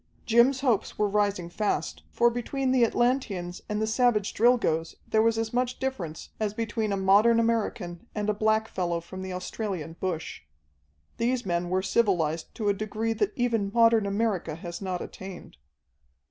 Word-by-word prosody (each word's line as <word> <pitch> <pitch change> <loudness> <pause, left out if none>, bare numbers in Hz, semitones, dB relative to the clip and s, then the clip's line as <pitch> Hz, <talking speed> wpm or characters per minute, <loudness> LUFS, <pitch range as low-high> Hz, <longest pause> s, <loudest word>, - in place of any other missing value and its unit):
Jim's 240 +3 +4
hopes 235 -6 0
were 210 - +2
rising 200 -3 0
fast, 205 +4 -2
for 240 0 +3
between 255 +3 -2
the 255 -2 +4
Atlanteans 225 -7 0
and 210 0 -1
the 220 - +1
savage 220 -2 +2
Drilgoes 210 -9 +2
there 220 - +3
was 225 0 +2
as 225 0 -2
much 250 0 0
difference 195 -13 -4
as 210 -1 -1
between 225 -1 -2
a 200 - 0
modern 205 +5 +5
American 220 -5 -1
and 210 -1 -2
a 210 - +2
blackfellow 215 -5 0
from 185 +3 -9
the 190 0 -5
Australian 180 -3 -4
bush. 170 - -3 0.8
These 245 +1 0
men 175 -1 -1
were 185 +1 0
civilized 175 -7 0
to 215 -3 -2
a 205 - +4
degree 215 +2 -2
that 210 -2 0
even 230 -5 0
modern 230 -2 +4
America 200 -6 -1
has 170 +2 -7
not 185 -2 -3
attained. 185 - -10
210 Hz, 160 wpm, -27 LUFS, 185-230 Hz, 0.8 s, modern